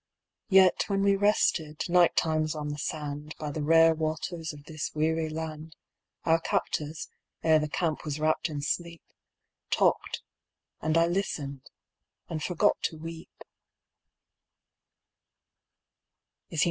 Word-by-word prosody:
Yet, 190 -2 +5
when 195 -1 0
we 200 0 +4
rested, 185 -6 +1
night 175 0 +4
times 155 -1 +1
on 150 -1 -4
the 145 0 -5
sand 150 0 -4
By 150 -1 -4
the 155 - -4
rare 165 +2 +6
waters 160 +1 -3
of 145 -1 -12
this 155 0 -4
weary 160 +1 +1
land, 155 0 -6 0.5
Our 165 0 +3
captors, 155 -1 -2 0.4
ere 160 -1 +5
the 150 0 -2
camp 160 -1 -1
was 150 0 -4
wrapped 155 +2 +1
in 145 -2 -4
sleep, 170 +2 -3 0.7
Talked, - - +1 0.6
and 155 +1 +1
I 165 - +5
listened, 150 -7 -3 0.6
and 160 -2 -4
forgot 175 +1 +1
to 160 - -2
weep. 165 +1 -9
160 Hz, 120 wpm, -28 LUFS, 150-165 Hz, 0.7 s, rare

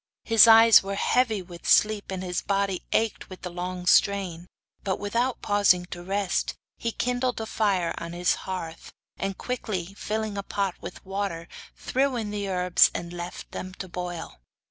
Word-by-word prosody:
His 225 0 +7
eyes 225 0 +8
were 195 +1 -4
heavy 220 -2 +1
with 175 -1 -8
sleep, 215 -1 +3
and 190 -1 -4
his 180 -1 -2
body 195 -2 -1
ached 225 -1 0
with 185 - -11
the 180 - -5
long 180 +1 -5
strain, 180 -2 +2 0.4
but, 190 -2 -1
without 235 +5 -1
pausing 200 -3 +3
to 175 - -6
rest, 195 +1 -1 0.2
he 230 - -2
kindled 250 +1 -1
a 220 - -3
fire 200 -6 0
on 170 0 -6
is 175 0 +2 0.2
hearth, 165 -3 -6 0.3
and 195 -1 -3
quickly 195 -7 -4
filling 215 0 -3
a - - -1
pot 200 -1 -2
with - - -9
water, 190 -4 -3 0.3
threw 270 0 0
in 220 -3 -3
the 205 -1 -3
herbs 180 -1 +4
and 170 0 -5
left 175 0 -7
them 185 0 -7
to 190 - -7
boil. 175 - -6
195 Hz, 170 wpm, -26 LUFS, 180-215 Hz, 0.4 s, eyes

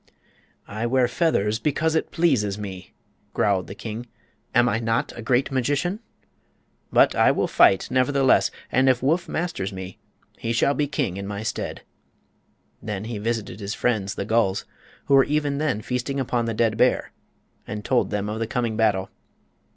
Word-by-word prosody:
"I 110 +3 -3
wear 130 0 +3
feathers 115 - +1
because 155 +5 0
it 160 - 0
pleases 120 - +1
me," 95 -3 -8 0.4
growled 100 -3 +1
the 100 - -8
king. 115 +2 -6 0.5
"Am 120 +1 +5
I 115 -1 +1
not 115 0 -1
a - - -7
great 125 +4 +1
magician? 145 - 0 0.9
But - - +5
I - - +4
will - - 0
fight, 95 - +4
nevertheless, 130 +1 +3 0.2
and 130 +1 +4
if 130 -1 +2
Woof 165 +6 +1
masters 155 - -2
me 95 -1 -8 0.4
he 115 - -2
shall 130 +4 +2
be 145 0 0
king 135 - -2
in 100 0 -5
my 105 +1 -4
stead." - - -4 1.0
Then 105 -2 -4
he 110 -1 -5
visited 115 -1 -3
his 100 +1 -4
friends, 105 -5 0
the 100 - -3
gulls, 105 -3 +1 0.4
who 140 - +1
were 135 -1 +7
even 145 -1 0
then 135 -9 -1
feasting 125 +2 -2
upon 120 -2 0
the 115 -1 -2
dead 110 -1 +1
bear, 125 +2 +2 0.6
and 105 -1 -6
told 125 -2 +2
them 105 -1 -2
of 105 +1 -3
the 115 - -1
coming 115 -1 -1
battle. 105 -4 +1
115 Hz, 170 wpm, -24 LUFS, 105-135 Hz, 1.0 s, were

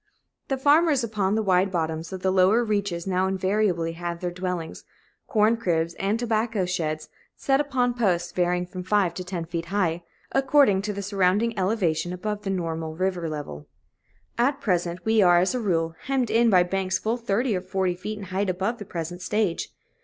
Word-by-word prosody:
The 270 - -1
farmers 290 0 +4
upon 210 -3 0
the 220 - +1
wide 190 -1 +3
bottoms 160 -2 -2
of 185 -1 -6
the 190 - +2
lower 190 +5 +4
reaches 200 -6 -1
now 185 0 +1
invariably 190 -3 0
have 170 0 -5
their 180 0 -3
dwellings, 180 -2 -4 0.4
corn 220 -1 +3
cribs, 170 -6 0
and 200 +3 +1
tobacco 225 -3 0
sheds 155 -4 -2 0.3
set 270 +1 +2
upon 255 -4 0
posts, 180 -8 0
varying 180 0 0
from 180 +1 -7
five 185 -1 +1
to 185 - -5
ten 180 -2 -4
feet 165 0 -4
high, 175 -2 0 0.3
according 270 -7 +4
to 210 +1 -3
the 200 0 -5
surrounding 200 +3 +1
elevation 185 -4 0
above 210 +3 -4
the 200 - -4
normal 165 -4 -3
river 180 -2 -1
level. 110 - -6 0.7
At 275 +4 +2
present 175 -4 -1
we 220 -1 +4
are, 175 -2 +6
as 185 +5 +2
a 250 - -1
rule, 165 -7 0
hemmed 265 -3 0
in 230 +1 +4
by 185 -4 +5
banks 190 +1 -1
full 225 +2 -1
thirty 235 0 0
or 180 - -2
forty 185 0 -1
feet 210 +4 -6
in 205 - -7
height 190 +1 -2
above 195 +6 -1
the 205 - -7
present 175 0 -5
stage. 200 -2 -1
190 Hz, 185 wpm, -25 LUFS, 175-215 Hz, 0.7 s, are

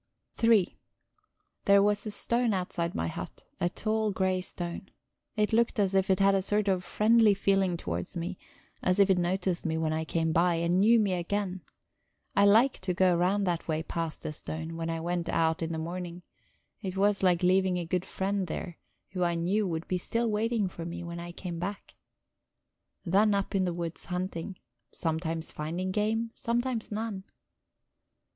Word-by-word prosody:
III 225 -5 +4 0.9
There 200 0 +6
was 205 +1 +1
a - - -1
stone 235 +1 +1
outside 175 -2 -2
my 80 - -1
hut, - - -7 0.2
a 175 - +1
tall 215 +3 -1
grey 190 -2 0
stone. 175 +1 -5 0.5
It 210 +1 +1
looked 235 +1 +2
as 195 -2 +2
if 190 0 +2
it 190 - +3
had 195 0 +5
a 195 - +2
sort 205 +2 +1
of 185 -2 +1
friendly 215 +2 +4
feeling 195 -2 +2
towards 85 - -4
me; 175 +2 -4 0.4
as 185 - +2
if 200 -1 +5
it 185 - +3
noticed 180 0 0
me 160 -1 -1
when 160 -1 0
I 160 0 -1
came 160 0 0
by, 170 +1 +3
and 170 +2 +1
knew 225 +4 +6
me 200 -3 +2
again. 185 +1 -2 0.7
I 200 - +5
liked 230 +6 +4
to 185 -1 -2
go 185 -1 +4
round 190 +4 +2
that 175 -2 -1
way 160 -1 -1
past 165 -1 -4
the 155 - -4
stone, 160 +2 -5
when 165 0 -3
I 165 0 -2
went 175 +1 -2
out 160 0 +1
in 165 0 -2
the 160 - -2
morning; 175 +1 -5 0.6
it 190 -2 -4
was 200 +1 +3
like 180 -2 +3
leaving 185 0 +3
a 175 - -3
good 180 +2 -1
friend 195 0 -2
there, 170 +1 -5 0.3
who 185 -1 -1
I 170 -1 +1
knew 190 +5 +1
would 165 -1 -3
be 185 - -1
still 230 +4 -1
waiting 220 -1 +1
for 170 -2 -7
me 170 +1 -5
when 170 0 -6
I 175 0 -6
came 175 -1 -6
back. 195 +3 -5 1.1
Then 200 +4 +4
up 200 +1 -2
in 190 -1 +2
the 180 - 0
woods 170 -1 -4
hunting, 180 0 -4 0.3
sometimes 160 0 -2
finding 170 +5 -3
game, 220 +3 0
sometimes 240 -1 -2
none... 210 -2 -3
185 Hz, 185 wpm, -29 LUFS, 170-205 Hz, 1.1 s, There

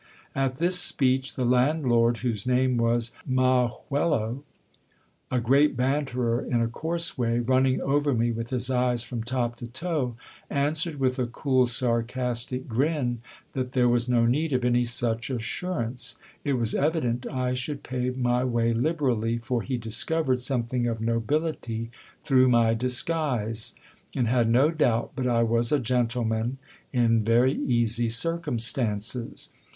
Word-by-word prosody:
At 135 -1 -1
this 175 +5 +2
speech, 135 -6 +1
the 130 - -1
landlord, 125 -2 +2
whose 115 -2 -1
name 125 0 +2
was 115 0 +1
Ma 130 -1 +2 0.2
juelo, 140 -4 0 0.9
a 125 - 0
great 135 +3 +3
banterer 125 -3 0
in 120 - 0
a 115 - +1
coarse 165 +6 -2
way, 115 -1 +1
running 130 +2 +2
over 145 0 +1
me 120 +1 +1
with 115 0 -4
his 125 0 -2
eyes 125 -2 +2
from 120 -1 -5
top 120 -1 -2
to 120 - -7
toe, 130 -1 -2 0.3
answered 150 +2 -1
with 130 0 0
a 125 - 0
cool, 130 +1 +1
sarcastic 120 +1 -1
grin, 125 -1 -1 0.3
that 130 -1 -3
there 125 -2 +3
was 120 0 +1
no 120 -1 +3
need 145 +6 +1
of 125 -1 0
any 120 0 +2
such 115 0 -2
assurance; 125 0 -2 0.3
it 140 - 0
was 120 -3 +1
evident 135 -5 0
I 125 -1 -2
should 140 +3 -3
pay 125 0 -2
my 125 -1 0
way 120 -2 +1
liberally, 120 -4 0
for 120 0 -2
he 130 +1 -3
discovered 130 +4 0
something 125 -1 -1
of 115 -1 -2
nobility 115 0 -2 0.3
through 130 -2 +4
my 115 -2 +4
disguise, 125 -2 -1 0.4
and 125 -3 +1
had 120 -1 +2
no 130 +7 +4
doubt 120 -8 +1
but 130 -2 -1
I 115 -1 +2
was 115 +1 +1
a 150 - +4
gentle 120 0 0
man 110 +4 -1 0.3
in 115 -3 +2
very 120 +4 +3
easy 120 -2 0
circumstances. 115 -5 +1
125 Hz, 150 wpm, -26 LUFS, 115-135 Hz, 0.9 s, through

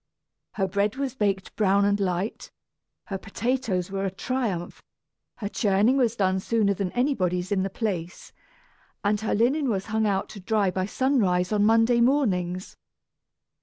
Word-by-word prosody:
Her 195 -2 0
bread 200 +3 0
was 270 -2 -3
baked 200 -6 -1
brown 200 -1 +3
and 205 0 +2
light, 190 +2 -2 0.6
her 195 -1 -4
potatoes 205 -3 -2
were 195 0 -2
a 195 - 0
triumph, 195 -3 -3 0.5
her 205 - -5
churning 205 +4 +2
was 240 -4 +2
done 190 -3 +1
sooner 210 0 +1
than 195 -2 -3
anybody's 185 -9 0
in 195 -2 +2
the 195 - -1
place, 185 -4 -4 0.7
and 205 +1 +1
her 220 - 0
linen 260 +6 +2
was 195 -4 -1
hung 220 0 +2
out 195 -1 0
to 205 - -9
dry 200 0 +1
by 185 +1 -2
sunrise 205 -8 +1
on 205 -1 +3
Monday 225 +2 +4
mornings. 190 -9 +1
205 Hz, 155 wpm, -25 LUFS, 190-230 Hz, 0.7 s, Monday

